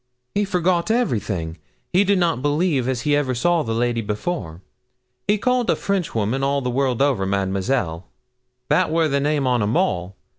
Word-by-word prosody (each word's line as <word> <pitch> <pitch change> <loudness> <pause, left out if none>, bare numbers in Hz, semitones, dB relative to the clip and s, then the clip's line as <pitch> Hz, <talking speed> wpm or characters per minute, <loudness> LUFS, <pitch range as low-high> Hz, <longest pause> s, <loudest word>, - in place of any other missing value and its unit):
'He 205 0 +1
forgot 180 -1 +1
everything; 105 - -1 0.3
he 185 +3 +5
did 200 0 +2
not 170 -7 +1
believe 145 -2 +1
as 130 -3 -1
he 145 +3 +2
ever 135 -3 0
saw 170 +7 +2
the 115 -5 -2
lady 120 0 0
before. 105 - -4 0.6
He 210 - +3
called 250 +2 +1
a - - +4
Frenchwoman, 135 - -1
all 140 0 +1
the 125 - -1
world 130 0 +1
over, 135 -9 +1
Madamasel 95 -1 -1 0.6
that 165 +4 +2
wor 160 0 +2
the 140 -1 +1
name 145 0 0
on 125 -2 +2
'em 105 +3 +1
all. 90 +2 -1
135 Hz, 175 wpm, -22 LUFS, 105-170 Hz, 0.6 s, he